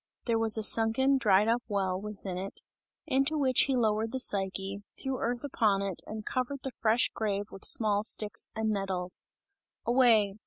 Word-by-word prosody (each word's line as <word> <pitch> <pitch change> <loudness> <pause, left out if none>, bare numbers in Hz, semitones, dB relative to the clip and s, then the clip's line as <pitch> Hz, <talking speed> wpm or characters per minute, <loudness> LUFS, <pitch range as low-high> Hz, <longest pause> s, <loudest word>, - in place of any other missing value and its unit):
There 230 -2 +1
was 225 -1 +5
a 220 - -2
sunken, 230 +6 +4
dried 205 -2 +3
up 235 +2 +1
well, 190 -3 -2
within 200 -3 -6
it, 190 +2 -6 0.4
into 275 +1 0
which 260 -3 +3
he 270 - 0
lowered 220 -2 0
the 260 - -3
Psyche, 195 -2 -1 0.2
threw 265 -2 -3
earth 240 +2 -3
upon 215 -8 0
it 195 -3 -4
and 215 0 -7
covered 260 +2 -3
the 265 - -4
fresh 230 0 +1
grave 205 -2 -2
with 195 - -11
small 210 -2 +3
sticks 210 -1 0
and 220 0 -1
nettles. 190 -3 -3 0.6
"Away! 225 -5 +3
220 Hz, 170 wpm, -29 LUFS, 200-245 Hz, 0.6 s, was